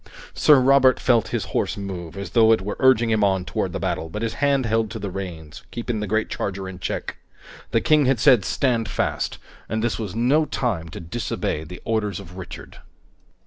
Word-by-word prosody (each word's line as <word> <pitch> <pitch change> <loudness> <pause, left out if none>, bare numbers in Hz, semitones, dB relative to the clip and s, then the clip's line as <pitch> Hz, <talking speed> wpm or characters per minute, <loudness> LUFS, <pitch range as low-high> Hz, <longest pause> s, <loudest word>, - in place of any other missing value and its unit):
Sir 150 -3 +6
Robert 130 -1 +5
felt 120 -3 +2
his - - -2
horse - - 0
move, 95 -3 -6
as 100 - -6
though 115 -2 +5
it 110 -4 +3
were 105 - -3
urging 120 -3 +4
him 110 -1 +2
on 95 -2 +2
toward - - -2
the - - -4
battle, 80 - -2
but 105 +7 -5
his 115 - -1
hand 140 -2 +2
held 110 -1 +1
to 110 - -6
the 100 -3 -5
reins, 85 -6 -7
keeping 120 -1 -3
the 105 - -3
great 110 +2 0
charger 95 -1 -4
in 95 -1 -8
check. - - -4 0.5
The - - +1
King 150 -2 +4
had 130 -3 +2
said 125 -5 +5
"Stand 120 -2 0
fast!" - - -2 0.3
and 110 0 -1
this 120 -1 -1
was 105 -3 -5
no 135 +7 +3
time 105 - -2
to - - -8
disobey 85 -4 -3
the 90 +3 -10
orders 105 -4 -1
of 90 -2 -11
Richard. 95 -1 -9
110 Hz, 205 wpm, -23 LUFS, 95-120 Hz, 0.5 s, Sir